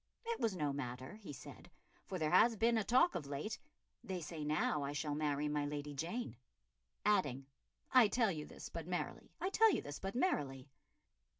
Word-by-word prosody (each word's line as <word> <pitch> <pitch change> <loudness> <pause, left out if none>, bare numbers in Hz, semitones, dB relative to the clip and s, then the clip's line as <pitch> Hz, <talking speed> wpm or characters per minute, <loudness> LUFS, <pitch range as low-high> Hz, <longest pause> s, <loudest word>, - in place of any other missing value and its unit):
It 465 0 -2
was 225 -4 +1
no 150 -5 0
matter, 130 +5 -5
he 205 -8 -9
said, 140 - -10 0.4
"for 185 - -3
there 155 -3 0
has 225 +6 +6
been 230 +2 +3
a 220 - +2
talk 255 - +4
of 145 - -4
late... 145 +10 -3 0.4
they 190 -2 -3
say 160 -1 -5
now 150 0 +1
I 140 0 -2
shall 145 0 -1
marry 150 -1 0
my 150 0 0
Lady 145 0 -3
Jane," 170 - -3 0.7
adding, 145 -11 +2 0.5
"I 250 -4 +8
tell 225 -1 +2
you 150 -3 -5
this - - -8
but 165 -1 -6
merrily, 180 0 -4
I 375 - -1
tell 450 +2 +6
you - - 0
this 145 0 -6
but 195 +2 -4
merrily." 140 - 0
155 Hz, 190 wpm, -37 LUFS, 145-220 Hz, 0.7 s, I